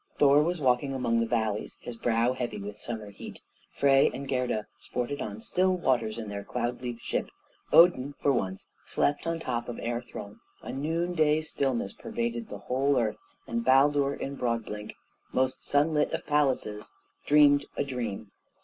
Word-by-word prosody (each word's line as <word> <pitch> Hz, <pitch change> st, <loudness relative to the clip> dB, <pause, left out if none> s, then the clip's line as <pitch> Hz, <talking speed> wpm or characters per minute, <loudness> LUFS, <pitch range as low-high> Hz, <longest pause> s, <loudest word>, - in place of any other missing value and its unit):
Thor 145 Hz, 0 st, +6 dB
was 170 Hz, +3 st, 0 dB
walking 135 Hz, 0 st, +1 dB
among 115 Hz, -3 st, +1 dB
the 115 Hz, -, +1 dB
valleys, 110 Hz, -3 st, -1 dB
his 120 Hz, -, -7 dB
brow 115 Hz, +1 st, +1 dB
heavy 120 Hz, -4 st, -3 dB
with 100 Hz, 0 st, -6 dB
summer 110 Hz, -3 st, -5 dB
heat; 100 Hz, -, -10 dB, 0.3 s
Frey 135 Hz, -1 st, +4 dB
and 135 Hz, +2 st, -6 dB
Gerda 125 Hz, -5 st, -1 dB
sported 125 Hz, +4 st, -3 dB
on 105 Hz, +1 st, -5 dB
still 185 Hz, +7 st, +1 dB
waters 120 Hz, -9 st, +1 dB
in 110 Hz, -2 st, -5 dB
their 100 Hz, -1 st, -5 dB
cloud 120 Hz, +2 st, -3 dB
leaf 120 Hz, -2 st, -4 dB
ship; 115 Hz, -, -2 dB, 0.4 s
Odin, 145 Hz, -5 st, +6 dB
for 140 Hz, -, +3 dB
once, 95 Hz, -7 st, -2 dB, 0.2 s
slept 145 Hz, +3 st, 0 dB
on 165 Hz, -, +1 dB
the 165 Hz, -, -8 dB
top 120 Hz, -1 st, -2 dB
of 120 Hz, -, -5 dB
Air 120 Hz, 0 st, -2 dB
Throne; 105 Hz, -4 st, -9 dB, 0.2 s
a -, -, -6 dB
noon 165 Hz, +5 st, -1 dB
day 155 Hz, -2 st, +3 dB
stillness 135 Hz, -9 st, -1 dB
pervaded 115 Hz, -1 st, -4 dB
the 105 Hz, -, -6 dB
whole 135 Hz, +2 st, +2 dB
earth; 110 Hz, -3 st, -1 dB, 0.3 s
and 115 Hz, 0 st, -2 dB
Baldur 140 Hz, +2 st, +4 dB
in 140 Hz, -, -5 dB
Broadblink, 115 Hz, -3 st, -3 dB, 0.4 s
most 130 Hz, 0 st, 0 dB
sunlit 150 Hz, +1 st, +2 dB
of -, -, -3 dB
palaces, 130 Hz, -8 st, 0 dB, 0.4 s
dreamed 145 Hz, -1 st, +6 dB
a -, -, +2 dB
dream. 120 Hz, -7 st, -4 dB
125 Hz, 170 wpm, -28 LUFS, 115-145 Hz, 0.4 s, Thor